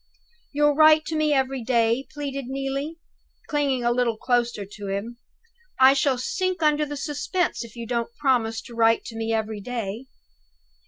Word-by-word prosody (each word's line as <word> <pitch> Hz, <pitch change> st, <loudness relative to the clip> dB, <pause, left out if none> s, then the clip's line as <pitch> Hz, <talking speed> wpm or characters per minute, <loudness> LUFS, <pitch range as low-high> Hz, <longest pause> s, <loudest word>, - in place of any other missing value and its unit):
"You'll 295 Hz, 0 st, +3 dB
write 310 Hz, +1 st, +6 dB
to 320 Hz, -, -3 dB
me 310 Hz, -1 st, +2 dB
every 265 Hz, -2 st, 0 dB
day?" 235 Hz, +1 st, +1 dB
pleaded 275 Hz, -2 st, -5 dB
Neelie, 275 Hz, +4 st, -3 dB, 0.5 s
clinging 280 Hz, -4 st, 0 dB
a 240 Hz, -, +2 dB
little 240 Hz, -2 st, +1 dB
closer 240 Hz, -4 st, 0 dB
to 205 Hz, 0 st, -9 dB
him. 210 Hz, +5 st, -4 dB, 0.6 s
"I 265 Hz, +1 st, +8 dB
shall 275 Hz, -1 st, +1 dB
sink 370 Hz, -, -2 dB
under 300 Hz, 0 st, +2 dB
the 290 Hz, 0 st, -5 dB
suspense, 305 Hz, +3 st, -2 dB
if 230 Hz, -1 st, -12 dB
you 235 Hz, -1 st, -6 dB
don't 235 Hz, 0 st, -2 dB
promise 240 Hz, -5 st, +1 dB
to 240 Hz, -, -12 dB
write 230 Hz, 0 st, +3 dB
to 225 Hz, -, -8 dB
me 225 Hz, 0 st, -2 dB
every 220 Hz, -1 st, -2 dB
day." 230 Hz, +1 st, -5 dB
255 Hz, 165 wpm, -24 LUFS, 230-290 Hz, 0.6 s, I